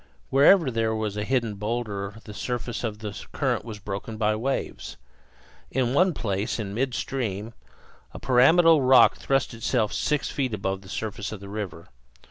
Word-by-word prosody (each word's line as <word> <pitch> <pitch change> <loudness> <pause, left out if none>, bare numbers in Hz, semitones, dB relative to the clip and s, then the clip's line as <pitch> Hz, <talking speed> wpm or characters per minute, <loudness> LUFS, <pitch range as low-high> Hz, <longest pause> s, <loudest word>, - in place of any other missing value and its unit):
Wherever 140 +2 +6
there 115 -1 0
was 110 -2 -2
a 105 - -2
hidden 120 -2 0
boulder 105 -2 -3
the 105 - -10
surface 120 +1 -4
of 110 -3 -3
the 105 - -5 0.2
current - - 0
was 110 -2 -7
broken 105 +2 -6
by 110 -1 +1
waves. 130 +5 -3 0.7
In 125 -1 0
one 180 +3 +3
place, 105 +1 -2
in 100 -3 -4
midstream, 120 -3 -2 0.6
a - - -9
pyramidal 155 +5 +5
rock 130 0 +6
thrust 135 -1 0
itself 115 -1 0
six 150 -2 0
feet 130 -6 -1
above 95 -1 -3
the 95 - -14
surface 105 -1 -4
of 110 - -6
the 100 0 -10
river. 100 -5 -6
115 Hz, 160 wpm, -25 LUFS, 105-130 Hz, 0.7 s, Wherever